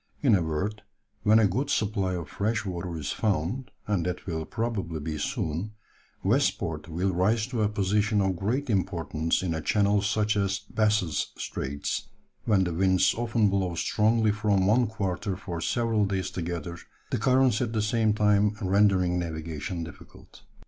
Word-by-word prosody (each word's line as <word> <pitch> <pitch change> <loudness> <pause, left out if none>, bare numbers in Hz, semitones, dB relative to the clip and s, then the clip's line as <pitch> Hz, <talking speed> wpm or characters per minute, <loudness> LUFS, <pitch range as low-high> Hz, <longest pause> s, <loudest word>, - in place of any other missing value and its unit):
In 130 -6 +5
a 95 - +4
word, 90 +7 -2 0.4
when 110 +1 +5
a 110 - +5
good 130 +9 0
supply 100 -6 0
of 85 -2 -5
fresh 110 +2 -1
water 85 -2 -4
is 75 -2 -3
found, 105 - -1 0.2
and 100 -5 0
that 90 -1 -4
will 80 -3 -3
probably 105 -7 -3
be 75 0 -4
soon, 80 +8 -2 0.5
West - - +2
Port 75 -1 -4
will 90 +4 0
rise 105 +5 +2
to 125 -2 -3
a 105 - +2
position 105 +1 +1
of 95 -2 +1
great 115 +11 -1
importance 85 - 0
in 85 -3 -1
a 80 - -2
channel 100 +3 +2
such 105 0 +1
as 100 -1 +1
Bass's 105 -8 0
Straits, 70 +1 -4 0.4
when 100 -4 +3
the 90 -2 -2
winds 95 +1 +3
often 115 -2 +1
blow 95 -3 0
strongly 110 +5 +2
from 105 -2 +1
one 115 +4 +4
quarter 100 -3 -2
for 90 -4 -5
several 115 +1 +1
days 95 -1 -2
together, 85 -1 -4 0.3
the - - 0
currents 130 -1 +3
at 120 -3 -1
the 110 - 0
same 110 0 +2
time 105 0 +3
rendering 95 -3 +3
navigation 80 0 -4
difficult." 80 - -13
100 Hz, 165 wpm, -27 LUFS, 85-110 Hz, 0.5 s, In